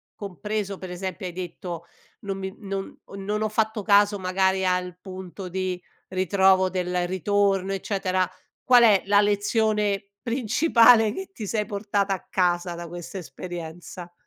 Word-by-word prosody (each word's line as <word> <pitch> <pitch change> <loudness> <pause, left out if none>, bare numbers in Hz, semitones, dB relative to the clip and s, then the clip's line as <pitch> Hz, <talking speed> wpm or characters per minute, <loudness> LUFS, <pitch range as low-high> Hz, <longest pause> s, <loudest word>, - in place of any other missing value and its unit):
compreso, 200 0 -4
per 185 - -7
esempio 185 +1 -5
hai 175 - -7
detto: 175 -1 -6 0.4
"Non 195 -1 -4
mi 190 +1 -5
non 195 -2 -5
o - - -12
non 210 +2 -2
ho 215 - 0
fatto 220 0 0
caso 205 0 +4
magari 190 0 +1
al 180 -1 -1
punto 185 0 -8
di 185 0 -2 0.3
ritrovo 190 0 +3
del 180 -1 -1
ritorno", 195 +1 +1
eccetera. 190 -1 0 0.4
Qual 245 -2 +6
è 210 -4 +5
la 205 +1 +5
lezione 205 -1 +1
principale 230 -2 +4
che 385 +7 -7
ti 220 - -6
sei 210 +1 -1
portata 200 -1 0
a 185 - -12
casa, 175 -1 +1
da 170 0 -7
questa 175 +3 -7
esperienza? 175 0 -8
195 Hz, 145 wpm, -25 LUFS, 185-205 Hz, 0.4 s, Qual